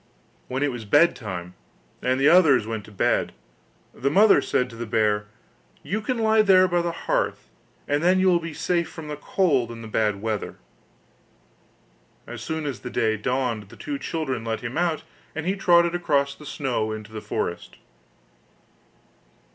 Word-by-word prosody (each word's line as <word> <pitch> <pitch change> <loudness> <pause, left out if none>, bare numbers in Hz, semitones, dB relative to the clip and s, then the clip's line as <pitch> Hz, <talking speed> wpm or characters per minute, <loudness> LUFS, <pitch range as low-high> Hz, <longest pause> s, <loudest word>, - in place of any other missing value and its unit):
When 130 +2 -2
it 145 - +1
was 120 -2 -6
bed 145 +11 +4
time, 90 -6 -6 0.5
and 130 +1 +1
the 140 - +4
others 155 - +6
went 110 -2 -5
to - - -14
bed, 100 - 0 0.6
the 140 - -1
mother 200 +7 +6
said 125 - 0
to - - -11
the 115 0 -6
bear: 105 -1 +1 0.6
'You 215 +3 -2
can 250 +4 -2
lie 220 -1 +4
there 185 -3 +5
by 175 -1 +1
the 170 0 -1
hearth, - - -1 0.4
and 145 +1 +1
then 180 +2 +4
you 190 - +3
will 175 -2 +4
be 165 0 -6
safe 170 +2 -1
from 155 -2 -9
the 150 - -3
cold 145 -6 +1
and 115 -1 -8
the - - -7
bad 105 -2 0
weather.' 110 -1 -3 1.7
As - - -8
soon 160 -1 -4
as 140 -3 -4
day 110 -3 0
dawned 120 -2 -2
the - - -13
two 285 -1 -5
children 135 - -3
let 115 -1 -3
him 120 +1 -5
out, 170 -2 0 0.3
and 160 +1 -4
he 190 +2 0
trotted 170 -3 +4
across 145 -5 +1
the 150 - -13
snow 125 -7 -2
into 110 0 -7
the 110 -1 -6
forest. - - -4
140 Hz, 175 wpm, -24 LUFS, 110-175 Hz, 1.7 s, others